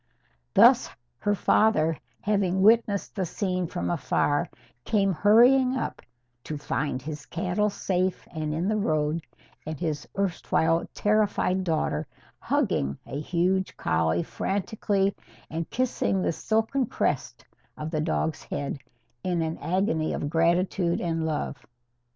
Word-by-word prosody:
Thus, - - +6 0.3
her 205 0 +1
father, 165 -6 +3 0.3
having 190 -3 +1
witnessed 215 -2 +3
the 190 - -1
scene 185 0 -2
from 175 - -3
afar, 145 -2 +1 0.3
came 195 -3 +2
hurrying 250 - +5
up, - - -4 0.4
to 155 - -4
find 145 -1 -2
his 150 +1 -7
cattle 185 +4 0
safe 185 -2 -1
and 155 -2 -3
in 165 +4 -1
the 215 +1 +1
road, 155 -3 0 0.4
and 155 -1 -6
his 155 -4 -3
erstwhile 165 -3 +1
terrified 205 -3 +1
daughter 155 -3 -1 0.3
hugging 70 0 0
a 140 - -5
huge 180 +4 0
collie 80 +1 +1
frantically 200 0 -1 0.4
and 165 0 -3
kissing 250 -6 0
the - - +1
silken 225 +9 0
crest - - -2 0.3
of 155 +1 -5
the 155 -2 0
dog's 160 0 -1
head 140 0 -4 0.4
in 175 -3 0
an 160 0 -3
agony 170 -4 0
of 145 - -3
gratitude 170 +1 +2
and 165 -2 -1
love. 150 -3 -3
175 Hz, 125 wpm, -26 LUFS, 155-200 Hz, 0.4 s, Thus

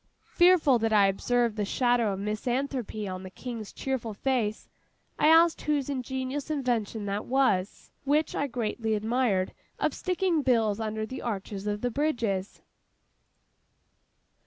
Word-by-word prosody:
Fearful 345 -8 +5
that 225 0 0
I 205 -2 +6
observed 230 +3 +1
a - - +2
shadow 240 +1 +2
of - - -4
misanthropy 220 +1 -2
on 185 -1 -5
the 190 - -8
King's 230 +1 -7
cheerful 235 -5 -3
face, 230 -3 -1 0.5
I - - +4
asked 330 +1 +5
whose 290 -2 0
ingenious 265 +2 -3
invention 235 -7 -1
that 200 +1 -3
was, 240 -8 0
which 295 +3 +1
I 285 - 0
greatly 225 -2 -2
admired, 215 -3 0 0.2
of - - 0
sticking 365 -3 0
bills 225 -6 +2
under 220 0 -2
the 255 +4 -7
arches 200 -2 -4
of 205 0 -2
the 245 - -1
bridges. 230 -9 -1
235 Hz, 135 wpm, -28 LUFS, 210-270 Hz, 0.5 s, I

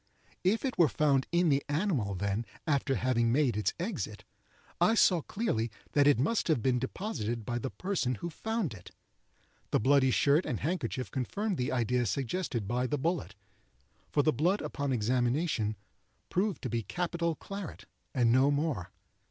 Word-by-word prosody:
If 210 +8 +2
it 260 - -3
were 170 - +7
found 140 -3 +2
in 175 -1 +3
the 140 -1 +2
animal 145 - 0
then, 100 +4 -1 0.2
after 140 -3 +1
having 120 0 +1
made 130 -3 +2
its 105 - 0
exit, 190 +7 -4 0.6
I 225 - +4
saw 180 -6 +5
clearly 130 - -1 0.2
that 145 -1 +4
it 145 - +5
must 180 - +1
have 160 -7 +3
been 125 -2 +2
deposited 120 - -3
by 120 +1 -2
the 130 - -3
person 170 -10 -1
who 170 +8 -5
found 220 - -2
it. 90 -4 -11 0.8
The - - +2
bloody 135 +3 +4
shirt 145 +6 +3
and - - -3
handkerchief 145 -6 -2
confirmed 195 - -2
the 125 - -1
idea 125 0 +1
suggested 125 - -2
by 125 +3 0
the 150 - -1
bullet; 130 - -2 0.7
for 145 - +2
the 155 - +3
blood 175 - +1
on 140 -1 -1
examination 120 0 +1 0.5
proved 195 +1 0
to 130 - -2
be 115 -1 0
capital 170 - -2
claret, 195 0 -7 0.3
and 120 -4 +3
no 130 +3 +5
more. 145 - -1
140 Hz, 165 wpm, -31 LUFS, 120-170 Hz, 0.8 s, were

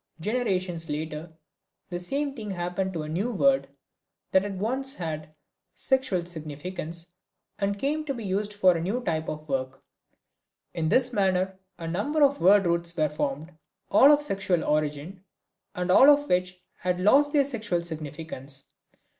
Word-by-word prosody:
Generations 185 -5 -1
later 155 +2 -4 0.6
the 175 - -2
same 280 +10 -2
thing 220 -6 -7
happened 180 +1 -2
to 160 -3 -3
a - - -6
new 190 +10 -1
word 270 +4 +3 0.6
that 195 +2 +2
once 260 +8 -1
had 155 -2 -5 0.4
sexual 260 -10 0
significance 165 +1 -6 0.5
and 200 0 0
came 295 +7 -1
to 280 - -2
be 230 - -6
used 200 +2 -1
for 190 -3 +4
a 165 - -2
new 215 +9 -2
type 160 -4 -1
of 155 0 -6
work. 135 -1 -2 0.9
In 160 -2 -1
this 255 +3 +3
manner 190 -2 +1 0.2
a 165 - -6
number 250 - +1
of 280 0 +3
word 195 +1 +6
roots 170 0 +1
were 155 -1 +2
formed, 150 +2 -3 0.4
all 280 - +8
of 295 0 +4
sexual 195 - 0
origin, 150 +5 -2 0.5
and 180 0 -1
all 265 +9 +8
of 290 0 +5
which 180 0 0 0.2
had 180 -1 -1
lost 275 +10 +4
their 285 -2 +3
sexual 215 -10 -2
significance. 150 -4 -6
180 Hz, 155 wpm, -27 LUFS, 160-220 Hz, 0.9 s, all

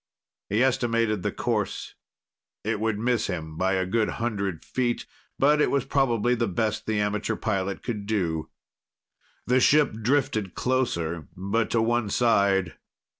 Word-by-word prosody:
He 110 +5 +2
estimated 115 -5 +1
the - - -1
course. - - -2 0.7
It 110 0 -1
would 110 -1 0
miss 115 0 +1
him 80 -3 -5
by 95 +3 +1
a 95 -1 +1
good 110 +4 +1
hundred 100 -7 -2
feet, 120 -2 -1 0.3
but 150 +2 +4
it - - +3
was 140 -2 +1
probably 120 -4 +2
the 120 -1 0
best 105 +3 -1
the 110 -1 +1
amateur 105 +2 -1
pilot 100 -3 -2
could 105 -4 -4
do. 85 -7 -1 1.0
The 125 +1 +3
ship 145 +1 +4
drifted 110 -6 0
closer, 85 - -1
but 100 +4 0
to 115 -1 +2
one 120 -2 +1
side. 100 -7 +2
110 Hz, 145 wpm, -26 LUFS, 100-120 Hz, 1.0 s, but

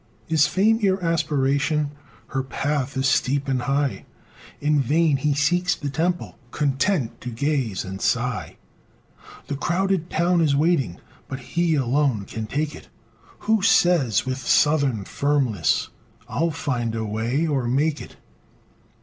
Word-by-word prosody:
Is 155 -2 +4
FAME 215 +7 +3
your 195 -3 +2
aspiration? 150 -2 +1 0.4
Her 135 - -1
path 135 +1 -2
is 135 0 +1
steep 135 +2 +1
and 130 -2 0
high; 140 +1 -1 0.5
In 150 0 +2
vain 150 +2 +2
he 145 +1 0
seeks 175 +6 +2
the 145 -2 -5
temple, 175 +4 -2
Content 140 - 0
to 125 - -5
gaze 125 -5 -1
and 95 0 -7
sigh; - - -1 0.9
The 145 - -4
crowded 175 +3 0
town 170 +1 +2
is 150 -3 +3
waiting, 145 - +1 0.3
But 130 0 -6
he 170 -2 +2
alone 135 -5 +1
can 110 +1 -6
take 150 +5 -2
it - - -13 0.5
Who 220 -1 +2
says, 165 - +3
with 130 0 -3
"SOUTHERN 140 -7 +2
FIRMNESS," 135 - 0 0.4
"I'LL 165 +3 0
FIND 120 -6 -2
A 110 -1 -2
WAY, 115 +8 -1
OR 140 -6 0
MAKE 145 +5 +1
IT!" - - -11
145 Hz, 140 wpm, -23 LUFS, 130-160 Hz, 0.9 s, Is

